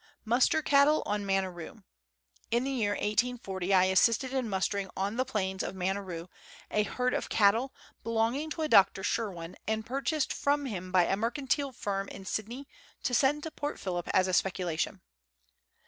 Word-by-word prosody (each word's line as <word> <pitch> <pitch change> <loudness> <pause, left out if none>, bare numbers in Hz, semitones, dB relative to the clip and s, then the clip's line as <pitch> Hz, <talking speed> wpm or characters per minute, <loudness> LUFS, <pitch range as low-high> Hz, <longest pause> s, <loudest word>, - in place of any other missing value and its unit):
Muster 245 +7 +3
Cattle 290 +2 +4
on 210 0 -1
Maneroo. 190 -4 -3 0.7
In 235 +2 +1
the 270 - -2
year 220 -6 0
1840 210 -4 -1
I 185 -1 +6
assisted 230 +7 +3
in 255 -4 -1
mustering 195 0 -1
on 200 +3 -1
the 255 +2 0
plains 190 -6 -2
of - - -4
Maneroo 185 -2 -3 0.4
a 210 - +2
herd 250 +4 -1
of - - -2
cattle, 225 +6 +3 0.3
belonging 230 +7 0
to 315 +1 -3
a - - +1
Dr. 195 -6 +5
Shirwin, 180 -7 -3
and 220 0 -1
purchased 275 +4 -1
from 285 0 0
him 185 -7 -5
by 180 -2 +4
a 195 - +1
mercantile 270 +5 -1
firm 200 -4 -3
in 195 - -9
Sydney 235 +8 -4 0.4
to 250 - -1
send 285 +4 +3
to 320 - -5
Port 290 -1 -4
Phillip 175 -2 -3
as 185 0 +3
a 185 - -2
speculation. 180 -1 0
215 Hz, 165 wpm, -30 LUFS, 190-260 Hz, 0.7 s, I